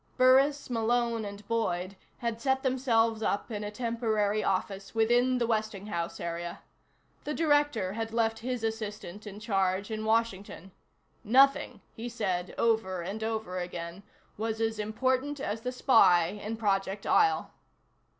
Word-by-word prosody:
Burris, 270 +3 +4
Malone 235 -1 0
and 200 0 -8
Boyd 195 -5 -1 0.2
had 230 -1 -3
set 265 -1 +1
themselves 230 -4 +2
up 205 +2 -1
in 210 -1 -3
a 205 - -3
temporary 215 -2 0
office 195 +2 -2
within 240 +3 +3
the 240 - +1
Westinghouse 210 -6 -2
area. 170 0 -5 0.6
The 300 - -3
Director 290 - +2
had 225 +1 -3
left 225 -1 +1
his 250 0 -3
assistant 215 -2 -5
in 205 0 -8
charge 195 -1 0
in 215 0 -3
Washington. 220 -4 -1 0.5
Nothing, 255 -1 +4
he 235 +2 -6
said 190 -6 -2
over 190 -6 +1
and 205 +5 -5
over 220 -5 -2
again, 175 0 -6 0.4
was 220 0 -2
as 225 -1 -1
important 260 +6 0
as 225 -4 -3
the 250 +1 -3
spy 180 -10 +5
in 210 +3 -5
Project 195 -2 -1
Isle. 410 -2 +3
220 Hz, 140 wpm, -29 LUFS, 200-240 Hz, 0.6 s, spy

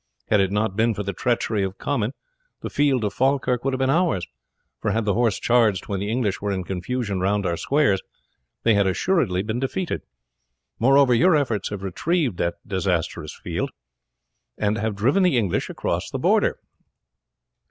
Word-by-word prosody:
Had 105 - +5
it 95 -1 +2
not 105 -1 0
been 115 +1 +2
for 105 - -3
the 100 0 -3
treachery 115 -1 0
of 95 0 -3
Comyn 125 -4 -1 0.5
the - - -5
field 140 -5 +2
of 105 -1 -1
Falkirk 130 -2 +1
would 135 - +1
have - - -5
been 130 0 +2
ours, 160 - +1 0.6
for - - 0
had 110 0 0
the 100 - +2
horse 115 -2 +1
charged 115 -6 +2
when 100 -2 -2
the 100 +2 -3
English 110 -4 -1
were 105 - -2
in 95 -1 -2
confusion 100 +3 -3
round 100 +2 0
our 85 -1 0
squares 135 - +2 0.6
they 115 - +4
had 100 -1 +3
assuredly 95 - +1
been 110 +3 -2
defeated. 160 +7 -2 0.8
Moreover, 135 +1 +5
your 160 +9 +5
efforts 125 -8 0
have 105 -2 -6
retrieved 130 - 0
that 85 0 -1
disastrous 95 -4 -2
field, - - -2 0.9
and 105 +1 +1
have 110 0 -1
driven 130 - +2
the 180 -8 +3
English 100 -7 0
across - - -2
the - - -3
Border." - - +2
110 Hz, 175 wpm, -23 LUFS, 100-130 Hz, 0.9 s, Had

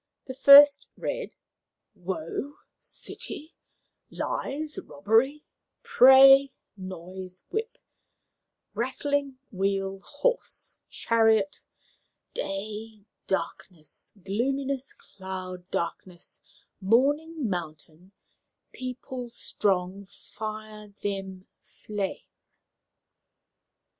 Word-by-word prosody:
The 260 - -6
first 280 +1 +8
read: - - -4 0.6
"Woe 185 - -5 0.2
city 310 +3 -7 0.6
lies 305 +2 -3
robbery 225 - +1 0.4
prey 270 - +8 0.2
noise 185 -1 -9
whip 445 +2 -3 1.0
rattling 275 +2 -2
wheel 195 -1 -1
horse 300 - -3
chariot 220 -3 +2 0.7
day 210 +2 -5 0.2
darkness 175 -4 -5
gloominess 270 +6 -2
cloud 185 -2 -8
darkness 175 +1 -5 0.4
morning 285 +8 +2
mountain 165 -1 -6 0.6
people 255 -1 -6
strong 195 -4 -1
fire 215 0 -9
them 195 -2 -4 0.4
flame." 205 -2 -3
215 Hz, 65 wpm, -27 LUFS, 190-270 Hz, 1.0 s, first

